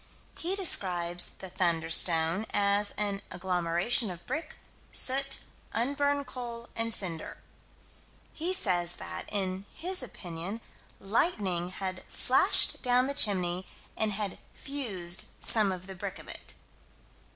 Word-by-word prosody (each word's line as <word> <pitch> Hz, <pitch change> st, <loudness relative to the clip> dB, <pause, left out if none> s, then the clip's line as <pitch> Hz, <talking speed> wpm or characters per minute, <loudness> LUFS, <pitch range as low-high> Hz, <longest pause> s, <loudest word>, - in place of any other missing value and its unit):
He 360 Hz, +4 st, -2 dB
describes 175 Hz, -, +2 dB
the 190 Hz, -2 st, -9 dB
"thunderstone" 170 Hz, +1 st, +2 dB
as 205 Hz, 0 st, +2 dB
an 200 Hz, -1 st, -1 dB
"agglomeration 180 Hz, +5 st, +1 dB
of 175 Hz, -1 st, -9 dB
brick, 315 Hz, -, -4 dB, 0.4 s
soot, 270 Hz, +1 st, +2 dB, 0.3 s
unburned 285 Hz, +3 st, 0 dB
coal, 235 Hz, -2 st, -7 dB
and 230 Hz, 0 st, -1 dB
cinder." 175 Hz, -7 st, -1 dB, 1.0 s
He 335 Hz, +3 st, -2 dB
says 175 Hz, -, +3 dB
that, 85 Hz, -, -6 dB
in 190 Hz, -1 st, -1 dB
his 365 Hz, +1 st, -1 dB
opinion, 185 Hz, -3 st, -7 dB, 0.4 s
lightning 195 Hz, -, 0 dB
had 185 Hz, 0 st, -5 dB
flashed -, -, +5 dB
down 250 Hz, 0 st, +3 dB
the 280 Hz, -, -2 dB
chimney, 185 Hz, -7 st, +1 dB, 0.3 s
and 215 Hz, -1 st, 0 dB
had 200 Hz, -1 st, -4 dB, 0.2 s
fused 200 Hz, -, -1 dB
some 215 Hz, -4 st, +6 dB
of 185 Hz, -1 st, -6 dB
the 190 Hz, -, -8 dB
brick 185 Hz, -, -6 dB
of -, -, -13 dB
it. -, -, -9 dB
195 Hz, 120 wpm, -29 LUFS, 175-245 Hz, 1.0 s, some